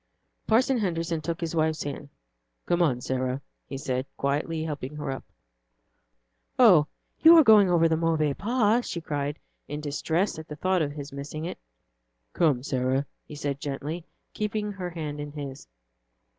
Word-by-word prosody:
Parson 245 +3 +3
Henderson 165 -4 -1
took 165 +2 -3
his 165 -1 -3
wife's 160 -1 +1
hand. 145 0 -6 0.6
"Come, 170 -8 +2
Sarah," 130 +1 -1 0.3
he 135 - -5
said, 130 -1 -2
gently 150 +3 -1
helping 150 -2 -5
her 145 -2 -3
up. 135 - -5 1.3
"Oh, 185 -12 +7 0.3
you 330 +1 +9
are 320 - +9
going 215 -5 +7
over 165 -2 +4
the 160 - +2
Mauvais 160 -3 +1
Pas," 230 - +2
she 170 - -3
cried 145 -2 -3 0.3
in 145 +1 -4
distress 160 +5 -1
at 160 - -9
the 150 - -7
thought 185 +3 +1
of 145 -2 -1
his 145 -1 -8
missing 145 +3 -5
it. 175 - -5 0.7
"Come, 145 -7 +2
Sarah," 130 +1 0 0.2
he 150 - -9
said 145 -2 -3
gently, 150 +3 -4 0.3
keeping 210 0 -2
her 185 -3 -5
hand 155 -4 -5
in 145 0 -6
his. 140 -3 -7
155 Hz, 155 wpm, -27 LUFS, 145-175 Hz, 1.3 s, you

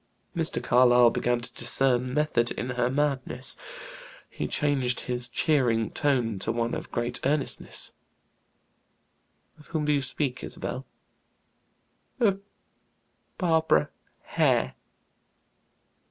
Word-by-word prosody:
Mr. - - -1
Carlyle 125 -1 +5
began 120 0 0
to - - -8
discern 125 0 +1
"method 150 -6 +2
in 125 +2 -4
her 125 0 0
madness." 135 -2 0 0.8
He 75 - -3
changed 135 - +1
his 125 -1 -3
cheering 120 -5 +1
tone 125 -8 0
to 110 - 0
one 115 0 -1
of - - -5
grave 120 +1 -1
earnestness. 140 0 -1 1.7
"Of 150 - -16
whom 155 -2 -2
to 150 - +2
you 140 - +2
speak, 135 -1 -2
Isabel?" 130 +2 -5 1.3
"Of 200 -5 +2 1.0
Barbara 160 - +2 0.3
Hare." - - +1
125 Hz, 105 wpm, -27 LUFS, 120-145 Hz, 1.7 s, Carlyle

